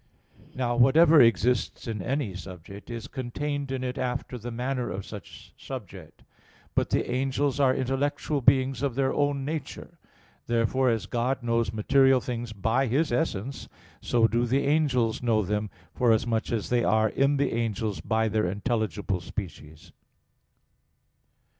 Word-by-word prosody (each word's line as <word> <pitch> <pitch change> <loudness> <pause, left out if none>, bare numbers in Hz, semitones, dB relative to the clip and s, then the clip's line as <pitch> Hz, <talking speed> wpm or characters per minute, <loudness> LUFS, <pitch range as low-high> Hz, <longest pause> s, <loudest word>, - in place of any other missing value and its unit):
Now 120 -2 -1
whatever 155 +5 +6
exists 120 +2 +2
in 110 -3 -3
any 130 -2 -2
subject, 95 +2 -10
is 115 -2 -6
contained 140 +2 -4
in 130 -1 -3
it 130 +1 -3
after 125 0 -3
the 120 +2 -6
manner 125 +1 -2
of 95 0 -5
such 105 -4 -11
subject. - - -9 0.5
But - - +1
the - - 0
angels 135 +2 0
are 130 -2 +4
intellectual 140 +2 -1
beings 130 0 +3
of 140 -4 -1
their 135 0 +1
own 145 -2 0
nature. 155 0 -6 0.5
Therefore, 120 +3 +2
as 115 -2 0
God 125 +2 -1
knows 115 -3 +1
material 135 +5 +4
things 120 -2 -5
by 115 +6 0
His 140 +6 +1
essence, 120 +1 -2 0.3
so 115 -2 +3
do 120 +2 0
the 135 +4 +1
angels 140 -6 +1
know 115 -3 +2
them, 105 +2 -2 0.2
forasmuch 115 -1 +1
as 115 -3 -2
they 120 -1 +2
are 110 0 +3
in 140 +5 +2
the 140 -1 0
angels 110 -3 -2
by 110 0 +1
their 105 -3 0
intelligible 105 -2 -2
species. 85 -5 -8
120 Hz, 145 wpm, -27 LUFS, 110-135 Hz, 0.5 s, whatever